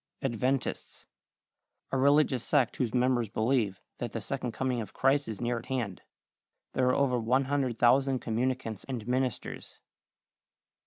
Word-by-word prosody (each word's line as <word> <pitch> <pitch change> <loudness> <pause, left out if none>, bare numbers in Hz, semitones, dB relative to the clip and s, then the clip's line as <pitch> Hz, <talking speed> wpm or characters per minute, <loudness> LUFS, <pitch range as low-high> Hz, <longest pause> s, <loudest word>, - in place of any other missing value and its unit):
=Adventists.= 130 +1 -2 0.9
A 135 - +1
religious 140 -2 +4
sect 135 -6 +2
whose 120 -4 0
members 125 -2 +2
believe 110 -3 0 0.2
that 120 -2 -4
the 115 - -2
second 125 +3 -3
coming 125 -1 -1
of 105 - -8
Christ 140 +2 +2
is 110 -3 -5
near 120 0 -1
at 115 - -13
hand. 120 -8 -3 0.7
There 130 - +2
are 125 - +3
over 130 -3 +2
100,000 130 +1 +2
communicants 120 -2 -2
and 120 -5 -5
ministers. 130 -1 -2
125 Hz, 130 wpm, -30 LUFS, 115-135 Hz, 0.9 s, religious